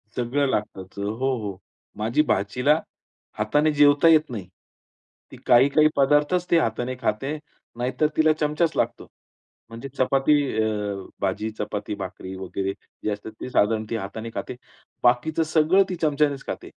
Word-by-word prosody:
सगळं 130 Hz, +4 st, 0 dB
लागतंच. 95 Hz, -4 st, -4 dB
हो, 120 Hz, +6 st, -1 dB
हो. 100 Hz, -3 st, -5 dB, 0.4 s
माझी 115 Hz, +7 st, +1 dB
भाचीला 125 Hz, +10 st, +2 dB, 0.6 s
हाताने 145 Hz, +9 st, +2 dB
जेवता 145 Hz, +2 st, +5 dB
येत 155 Hz, -2 st, +5 dB
नाही. 100 Hz, -6 st, -6 dB, 0.8 s
ती -, -, -11 dB
काही-काही 140 Hz, +5 st, +5 dB
पदार्थच 150 Hz, +6 st, +2 dB
ती 170 Hz, -, +6 dB
हाताने 120 Hz, -1 st, -1 dB
खाते. 135 Hz, +8 st, -1 dB, 0.4 s
नाहीतर 130 Hz, +5 st, 0 dB
तिला 155 Hz, 0 st, +5 dB
चमचाच 150 Hz, +2 st, +1 dB
लागतो. -, -, -1 dB, 0.6 s
म्हणजे 115 Hz, +4 st, -8 dB
चपाती 135 Hz, +3 st, +3 dB, 0.3 s
अ, 105 Hz, -2 st, -2 dB, 0.3 s
भाजी 100 Hz, +3 st, -1 dB
चपाती, 105 Hz, 0 st, -3 dB
भाकरी 95 Hz, 0 st, -7 dB
वगैरे 95 Hz, +1 st, -3 dB, 0.3 s
जे 105 Hz, -, 0 dB
असतात 105 Hz, +2 st, -6 dB
ते -, -, -5 dB
साधारण 110 Hz, -1 st, +2 dB
ती 115 Hz, -, -2 dB
हाताने 110 Hz, +2 st, -5 dB
खाते. -, -, -5 dB, 0.5 s
बाकीचं 140 Hz, +7 st, +2 dB
सगळं 165 Hz, +5 st, +5 dB
ती 180 Hz, -, -2 dB
चमच्यानेच 145 Hz, -2 st, +1 dB
खाते. -, -, -6 dB
125 Hz, 140 wpm, -24 LUFS, 105-150 Hz, 0.8 s, ती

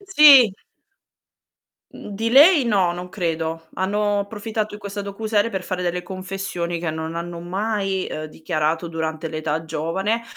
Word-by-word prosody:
Sì. 295 Hz, -, +7 dB, 1.4 s
Mhmm, 205 Hz, -, -9 dB
di 225 Hz, +3 st, -1 dB
lei 295 Hz, +2 st, +7 dB
no, 195 Hz, -6 st, +2 dB
non 180 Hz, +1 st, -7 dB
credo. 165 Hz, -3 st, -3 dB
Hanno 205 Hz, +2 st, 0 dB
approfittato 215 Hz, +1 st, -4 dB
di 210 Hz, -, -10 dB
questa 200 Hz, 0 st, -5 dB
docu-serie 210 Hz, +2 st, -1 dB
per 190 Hz, -3 st, -3 dB
fare 180 Hz, -1 st, -4 dB
delle 180 Hz, 0 st, -2 dB
confessioni 185 Hz, -2 st, -4 dB
che 165 Hz, -2 st, -2 dB
non 160 Hz, +1 st, -5 dB
hanno 170 Hz, 0 st, -5 dB
mai, 195 Hz, +1 st, -2 dB
ehm, 155 Hz, -, -5 dB
dichiarato 160 Hz, +1 st, -2 dB
durante 160 Hz, 0 st, -3 dB
l'età 155 Hz, 0 st, -3 dB
giovane, 165 Hz, +8 st, -2 dB
185 Hz, 145 wpm, -22 LUFS, 165-210 Hz, 1.4 s, Sì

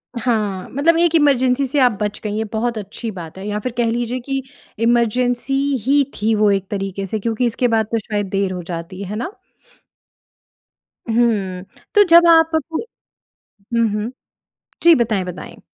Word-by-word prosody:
हाँ, 215 Hz, -6 st, -1 dB
मतलब 325 Hz, +5 st, +2 dB
एक 345 Hz, -1 st, +3 dB
इमरजेंसी 275 Hz, -3 st, +3 dB
से 280 Hz, +3 st, 0 dB
आप 250 Hz, -2 st, +5 dB
बच 210 Hz, 0 st, -2 dB
गई 210 Hz, -, -3 dB
ये 220 Hz, -, 0 dB
बहुत 230 Hz, +1 st, -1 dB
अच्छी 215 Hz, +3 st, -6 dB
बात 170 Hz, -2 st, -9 dB
है। 195 Hz, -, -7 dB
या 210 Hz, 0 st, -2 dB
फ़िर 250 Hz, +3 st, -4 dB
कह 235 Hz, -1 st, +2 dB
लीजिए 240 Hz, +1 st, -2 dB
कि 270 Hz, -1 st, -2 dB, 0.4 s
इमरजेंसी 240 Hz, +2 st, +1 dB, 0.3 s
ही 280 Hz, +1 st, +4 dB
थी 220 Hz, +2 st, 0 dB
वो 210 Hz, -1 st, +3 dB
एक 195 Hz, -1 st, -1 dB
तरीके 195 Hz, -1 st, -3 dB
से 215 Hz, +3 st, -3 dB
क्योंकि 230 Hz, +3 st, -1 dB
इसके 240 Hz, +1 st, +1 dB
बाद 225 Hz, -2 st, +2 dB
तो 230 Hz, -, +1 dB
शायद 205 Hz, -2 st, -3 dB
देर 195 Hz, -1 st, 0 dB
हो 180 Hz, -, -5 dB
जाती, 170 Hz, +2 st, -7 dB
है 200 Hz, +2 st, -5 dB
ना? 255 Hz, -, -5 dB, 1.8 s
हुँ, 205 Hz, -6 st, +1 dB, 0.3 s
तो 410 Hz, -, +8 dB
जब 340 Hz, +1 st, +8 dB
आपको 325 Hz, -1 st, +3 dB, 0.7 s
हुँ, 230 Hz, +3 st, -1 dB
हुँ। 210 Hz, +3 st, -2 dB, 0.7 s
जी 335 Hz, 0 st, +8 dB
बताएँ, 220 Hz, -7 st, 0 dB
बताएँ। 180 Hz, -1 st, -9 dB
230 Hz, 170 wpm, -19 LUFS, 200-255 Hz, 1.8 s, तो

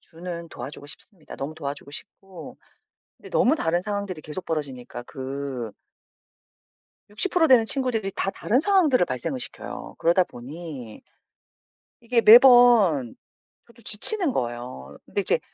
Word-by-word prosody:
주는 170 Hz, 0 st, -8 dB
도와주고 145 Hz, 0 st, -9 dB
싶습니다. 170 Hz, +2 st, -12 dB
너무 145 Hz, +3 st, -5 dB
도와주고 140 Hz, -1 st, -7 dB
싶고 185 Hz, +3 st, -11 dB, 0.6 s
근데 -, -, -14 dB
너무 280 Hz, +6 st, +3 dB
다른 175 Hz, -, 0 dB
상황들이 200 Hz, -5 st, -4 dB
계속 155 Hz, +5 st, -8 dB
벌어지니까 130 Hz, -6 st, -5 dB
그 130 Hz, -4 st, -6 dB, 1.4 s
60% 325 Hz, -, +1 dB
되는 245 Hz, -5 st, +5 dB
친구들이 225 Hz, -7 st, -1 dB
다 195 Hz, -, -1 dB
다른 250 Hz, +6 st, 0 dB
상황들을 325 Hz, -, +3 dB
발생을 125 Hz, -, -4 dB
시켜요. 245 Hz, -, -8 dB
그러다 175 Hz, +2 st, +3 dB
보니 135 Hz, -4 st, -10 dB, 1.0 s
이게 235 Hz, 0 st, +1 dB
매번 230 Hz, -, +6 dB, 0.5 s
저도 235 Hz, 0 st, -20 dB
지치는 295 Hz, -, +2 dB
거예요. 120 Hz, -, -5 dB
근데 -, -, -2 dB
이제 -, -, +1 dB
175 Hz, 295 characters per minute, -24 LUFS, 140-235 Hz, 1.4 s, 매번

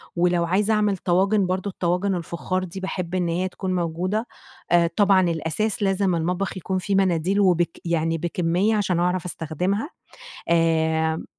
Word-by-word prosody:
ولو 175 Hz, 0 st, +2 dB
عايزة 205 Hz, +5 st, +1 dB
أعمل 210 Hz, -2 st, +1 dB
طواجن 195 Hz, +3 st, +2 dB
برضه 185 Hz, +2 st, -2 dB
الطواجن 180 Hz, +2 st, 0 dB
الفخار 175 Hz, +2 st, -3 dB
دي 185 Hz, +1 st, -7 dB
باحب 185 Hz, -2 st, -4 dB
إن 180 Hz, -2 st, 0 dB
هي 175 Hz, +3 st, 0 dB
تكون 185 Hz, 0 st, -4 dB
موجودة. 180 Hz, +6 st, -1 dB, 0.4 s
آآ 170 Hz, -1 st, +5 dB
طبعًا 195 Hz, -2 st, +5 dB
الأساس 185 Hz, +7 st, -2 dB
لازم 195 Hz, -2 st, +1 dB
المطبخ 180 Hz, +4 st, -2 dB
يكون 185 Hz, +1 st, -2 dB
فيه 195 Hz, +2 st, -1 dB
مناديل 190 Hz, 0 st, +2 dB
وبك 175 Hz, -4 st, +2 dB
يعني 165 Hz, -1 st, 0 dB
بكمية 175 Hz, +5 st, 0 dB
عشان 190 Hz, -5 st, 0 dB
أعرف 180 Hz, 0 st, 0 dB
أستخدمها. 180 Hz, -, -2 dB, 0.6 s
آآ 160 Hz, -1 st, +1 dB
180 Hz, 150 wpm, -23 LUFS, 170-195 Hz, 0.6 s, آآ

